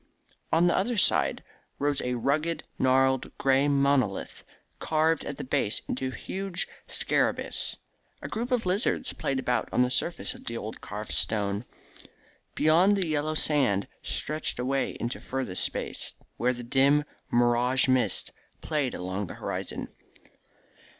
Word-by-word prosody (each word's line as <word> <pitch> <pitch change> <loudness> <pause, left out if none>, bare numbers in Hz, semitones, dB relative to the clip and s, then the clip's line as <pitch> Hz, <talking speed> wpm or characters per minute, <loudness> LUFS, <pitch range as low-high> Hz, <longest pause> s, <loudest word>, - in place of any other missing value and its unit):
On 165 +2 +4
the 175 - +3
other 230 +4 0
side 80 - +3 0.3
rose 145 0 0
a 125 0 -1
rugged, 150 +7 0 0.2
gnarled, 130 0 +2
grey 135 +1 +3
monolith, 140 -7 +1 0.4
carved 160 +1 +1
at 140 - -5
the - - -5
base 110 -4 0
into 130 +1 -2
a 130 - -5
huge 195 -2 -2 0.2
scarabaeus. - - 0 0.4
A - - -6
group 235 +3 -3
of 245 -5 +1
lizards 205 +7 0
played 135 - -2
about 125 -1 0
on 125 - +3
the 125 - 0
surface 165 +6 -1
of - - -14
the 115 - -4
old 110 -1 -7
carved 105 +1 -6
stone. 105 0 +1 0.9
Beyond, 175 +7 +4
the 190 - +1
yellow 155 0 -1
sand 130 -11 +3
stretched 155 +1 -1
away 135 +2 -1
into 120 - -3
furthest 130 -8 -1
space, - - -3 0.2
where 125 +1 +1
the 120 0 -7
dim 140 +4 +3 0.3
mirage 120 +2 +3
mist 125 -6 +3 0.3
played 150 -5 -1
along 95 +2 -3
the - - -8
horizon. - - -4
135 Hz, 145 wpm, -27 LUFS, 120-155 Hz, 0.9 s, On